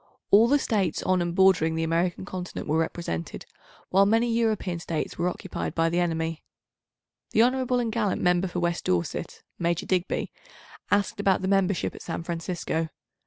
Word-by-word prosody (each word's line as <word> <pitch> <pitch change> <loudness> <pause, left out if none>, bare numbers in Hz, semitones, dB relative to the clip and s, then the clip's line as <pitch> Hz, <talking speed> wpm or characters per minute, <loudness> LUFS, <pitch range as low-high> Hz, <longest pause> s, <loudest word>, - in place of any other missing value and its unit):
All 215 +4 +7
the 285 +4 +4
States 200 - 0
on 185 -1 +2
and 175 0 -2
bordering 185 -4 +4
the 165 - 0
American 170 +3 0
Continent 185 -2 -6
were 155 +2 +2
represented, 160 - -3 0.5
while 195 +2 +5
many 230 +2 +2
European 215 -6 0
States 165 -1 -3
were 175 +1 +2
occupied - - -5
by 165 0 +2
the 170 +1 0
enemy. 165 -2 -1 0.9
The 220 - +6
hon. 250 +2 +4 0.3
and 235 -2 -1
gallant 215 -4 0
Member 180 +1 +2
for 180 0 -3
West 170 0 -1
Dorset 85 -2 -2 0.2
(Major 170 -1 0
Digby) 185 -1 -1 0.6
asked 205 0 +1
about 195 -2 +2
the - - 0
membership 195 -1 +1
at - - -11
San 165 -1 -4
Francisco. 165 -1 -3
180 Hz, 165 wpm, -26 LUFS, 165-200 Hz, 0.9 s, All